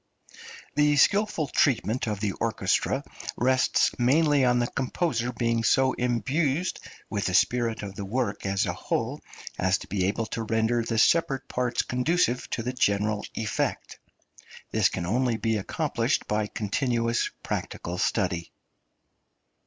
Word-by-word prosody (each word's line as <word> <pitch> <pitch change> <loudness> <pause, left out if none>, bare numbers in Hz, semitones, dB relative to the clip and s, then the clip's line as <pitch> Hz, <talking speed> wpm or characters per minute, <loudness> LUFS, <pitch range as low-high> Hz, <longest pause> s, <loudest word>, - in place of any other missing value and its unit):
The 150 0 +3
skilful 200 -1 +3
treatment 120 -3 +1
of 105 -2 -3
the 105 -2 0
orchestra - - 0 0.3
rests 130 +1 +3
mainly 145 +3 +3
on 125 -1 +3
the 120 - +2
composer 125 -1 -1
being 115 -1 0
so 130 +3 +3
imbued 135 +7 0 0.3
with 100 -2 -2
the 90 - 0
spirit 115 +2 +2
of 100 -1 -6
the 100 - -6
work 105 0 -2
as 100 0 0
a - - -2
whole - - -3 0.4
as 95 +1 +2
to - - -11
be 95 -3 0
able 105 +4 -1
to 115 - -4
render 115 +1 +1
the 115 0 -2
separate 135 +1 +3
parts 125 -1 -1
conducive 125 0 0
to 115 - -3
the 125 +2 -3
general 105 -3 +1
effect. 110 -2 -2 0.7
This - - +3
can 85 - -4
only 120 +4 +1
be 110 -1 0
accomplished 100 - -1
by 105 0 0
continuous 115 +2 0
practical 90 +1 -4
study. 90 -5 0
120 Hz, 140 wpm, -26 LUFS, 105-130 Hz, 0.7 s, The